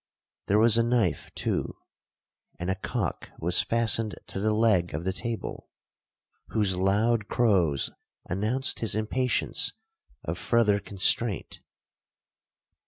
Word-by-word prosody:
There 100 - +3
was 115 +1 +5
a - - +4
knife 115 -8 0
too; - - -2 0.8
and 90 +2 -2
a - - -1
cock 95 - -4
was 90 +2 +1
fastened 115 -2 +1
to - - -5
the 110 +2 +1
leg 105 -7 +2
of 75 - -4
the 95 +1 -1
table, 115 +3 -5 0.8
whose 105 -4 +1
loud 105 +4 +1
crows 90 - +1 0.4
announced 110 +9 +1
his 110 -3 0
impatience 120 +4 0 0.5
of - - -4
further 110 -4 +2
constraint. 100 +2 0
105 Hz, 115 wpm, -27 LUFS, 95-115 Hz, 0.8 s, was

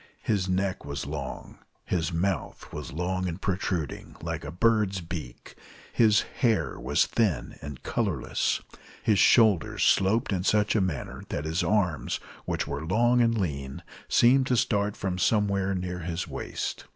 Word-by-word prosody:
His 95 -4 0
neck 95 +1 0
was 70 +1 -4
long, 70 -3 -6 0.3
his 90 -1 -1
mouth 90 +2 -2
was - - -6
long 90 +3 -1
and 85 +1 -4
protruding, 90 -6 -2
like - - -4
a 70 - -6
bird's 105 +2 +2
beak, 80 -7 -7 0.4
his 110 -3 +5 0.2
hair 115 -5 +1
was - - +2
thin 100 - -1
and 70 -2 -8
colorless, 95 - -1 0.4
his 105 -3 +3
shoulders 110 -8 +4
sloped 100 +3 +3
in 90 -1 -1
such 105 +2 +2
a 110 - +3
manner 90 -7 -3
that 75 - -3
his 80 +4 0
arms, 90 -8 0 0.3
which - - -1
were 70 +2 -4
long 120 +8 +3
and 115 -1 +3
lean, 70 -8 -3 0.3
seemed 130 +2 +5
to 125 - +2
start 105 -4 +1
from 95 -2 -2
somewhere 100 -2 +2
near 90 -1 -3
his 85 +1 -3
waist. - - -4
95 Hz, 150 wpm, -27 LUFS, 80-105 Hz, 0.4 s, his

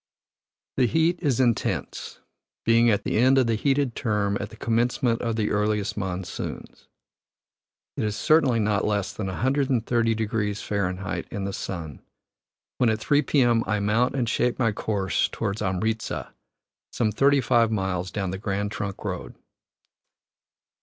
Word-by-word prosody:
The 125 - +4
heat 165 +5 +2
is 140 -8 +1
intense, 120 -4 -1 0.4
being 115 +1 +5
at 100 -2 +1
the - - 0
end 130 +3 +5
of 130 - +4
the 115 - +1
heated 135 +2 +1
term 105 -3 0
at 100 - -4
the 110 - -12
commencement 115 +1 +1
of 115 -2 -1
the 110 -2 0
earliest 105 -1 0
monsoons. 95 -3 -5 1.1
It - - -2
is 105 -1 -1
certainly 140 -4 +3
not 105 -1 +1
less 105 -2 -1
than 105 - -4
130 120 0 +1
deg. 110 -1 -2 0.3
Fahr., 100 -2 -1 0.4
in 100 -4 -4
the 100 0 -3
sun, 80 -8 -6 0.8
when 125 - +4
at 110 - +1
3 145 +6 +3
p.m. 120 -5 +3
I 105 -1 +1
mount 110 +6 +1
and 125 -3 0
shape 120 +2 +1
my 115 -4 +2
course 100 -3 0
toward 100 - -3
Amritza, 110 +3 -2 0.6
some 110 -3 0
thirty 140 +6 +4
five 120 -3 +3
miles 95 -4 -1
down 95 +1 -3
the 95 - -5
Grand 100 0 -2
Trunk 100 -2 -5
Road. - - -5
110 Hz, 150 wpm, -25 LUFS, 100-120 Hz, 1.1 s, being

